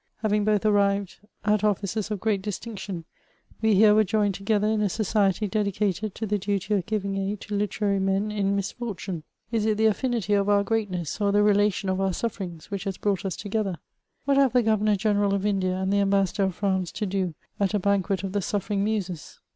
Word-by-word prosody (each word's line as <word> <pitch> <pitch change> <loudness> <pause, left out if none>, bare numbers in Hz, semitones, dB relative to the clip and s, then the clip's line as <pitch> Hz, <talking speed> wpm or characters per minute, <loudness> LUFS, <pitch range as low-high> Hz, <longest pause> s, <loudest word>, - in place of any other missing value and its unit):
Having 210 -1 +2
both 215 -1 +2
arrived 200 -2 +2 0.3
at 210 0 +2
offices 205 0 0
of 210 -2 -3
great 205 -1 0
distinction, 200 -4 -5 0.6
we 220 -2 +4
here 210 +1 +6
were 215 +1 +5
joined 205 0 +1
togedier 210 +2 +1
in. 215 - 0
a 205 - +2
society 210 0 +1
dedicated 205 0 -1
to 220 - -3
the 210 0 0
duty 200 +1 -1
of 195 -4 0
giving 200 -2 -1
aid 195 +1 -2
to 210 - -7
literary 205 0 0
men 195 +2 0
in 200 -1 0
misfortune. 200 -3 -4 0.3
Is 220 -2 +1
it 215 -1 +1
the 220 - +2
affinity 220 -1 +1
of 200 0 +2
our 200 -1 +4
g^reatness, 200 -5 -2
or 200 -1 +3
the 205 +1 +4
relation 205 -1 +2
of 190 0 0
our 195 - +2
suffisrings^ 190 -4 -5
which 200 0 -4
has 195 -2 -3
brought 200 -2 -1
us 185 -4 -2
together? 205 -3 -2 0.5
What 280 0 +3
have 275 -3 +4
the 250 -1 +4
Governor: 215 -1 +2
general 205 -1 +1
of 195 - -2
Lidia 190 -3 +1
and 190 +1 -1
the 200 - +3
Ambassador 195 0 +2
of 190 -2 -2
France 190 -4 -1
to 215 - -2
do 185 -4 -2 0.2
at 200 +1 +1
a - - +2
banquet 200 0 0
of 195 - -3
the 205 - 0
sufFeriog 200 +1 -2
Muses 195 -5 -3
200 Hz, 205 wpm, -26 LUFS, 195-215 Hz, 0.6 s, here